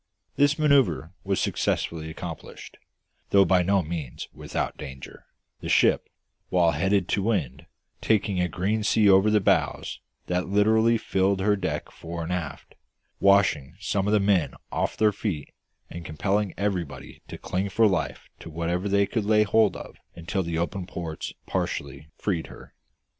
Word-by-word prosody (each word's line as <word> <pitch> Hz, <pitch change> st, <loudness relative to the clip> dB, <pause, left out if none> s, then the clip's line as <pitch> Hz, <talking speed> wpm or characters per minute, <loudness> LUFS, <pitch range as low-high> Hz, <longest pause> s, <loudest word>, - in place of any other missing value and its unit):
This 145 Hz, +1 st, +3 dB
manoeuvre 125 Hz, -, +2 dB
was 95 Hz, -1 st, 0 dB
successfully 80 Hz, -1 st, -1 dB
accomplished, 80 Hz, 0 st, -8 dB, 0.5 s
though 100 Hz, -1 st, +5 dB
by 95 Hz, -1 st, +4 dB
no 95 Hz, +1 st, +2 dB
means 80 Hz, -6 st, -5 dB
without -, -, -3 dB
danger, 65 Hz, -1 st, -10 dB, 0.3 s
the -, -, -6 dB
ship, -, -, +3 dB, 0.4 s
while 85 Hz, -2 st, +3 dB
head 95 Hz, +5 st, +1 dB
to 100 Hz, -, 0 dB
wind, 85 Hz, -, -2 dB, 0.3 s
taking 105 Hz, -3 st, +1 dB
a 90 Hz, -, +1 dB
green 105 Hz, +5 st, -1 dB
sea 105 Hz, +1 st, +3 dB
over 95 Hz, +2 st, +6 dB
the 105 Hz, 0 st, +4 dB
bows 95 Hz, -, 0 dB, 0.3 s
that 90 Hz, 0 st, -1 dB
literally 110 Hz, +3 st, +3 dB
filled 95 Hz, -2 st, +1 dB
her 105 Hz, +1 st, +3 dB
decks 95 Hz, -2 st, -4 dB
fore 85 Hz, 0 st, -6 dB
and 85 Hz, +2 st, -3 dB
aft, 85 Hz, -5 st, -5 dB, 0.5 s
washing 95 Hz, -7 st, +3 dB
some 100 Hz, -1 st, -1 dB
of 105 Hz, -, +2 dB
the 105 Hz, -, +5 dB
men 100 Hz, -4 st, +2 dB, 0.2 s
off -, -, -1 dB
their 110 Hz, -1 st, +4 dB
feet 95 Hz, -8 st, -4 dB, 0.3 s
and 85 Hz, 0 st, -8 dB
compelling 95 Hz, +6 st, -1 dB
everybody 95 Hz, -7 st, -3 dB
to -, -, -8 dB
cling 95 Hz, +2 st, -2 dB
for 115 Hz, +3 st, +3 dB
life 95 Hz, -5 st, -1 dB
to -, -, -10 dB
whatever 85 Hz, +4 st, -2 dB
they 100 Hz, 0 st, +3 dB
could 110 Hz, 0 st, -2 dB
lay 105 Hz, 0 st, +4 dB
hold 105 Hz, 0 st, +3 dB
of -, -, -10 dB, 0.2 s
until 85 Hz, +3 st, -2 dB
the 85 Hz, -2 st, -3 dB
open 90 Hz, +2 st, -3 dB
ports 85 Hz, -3 st, -5 dB
partially 70 Hz, +2 st, -3 dB
freed 90 Hz, -6 st, -2 dB
her. -, -, -13 dB
95 Hz, 160 wpm, -26 LUFS, 85-105 Hz, 0.5 s, over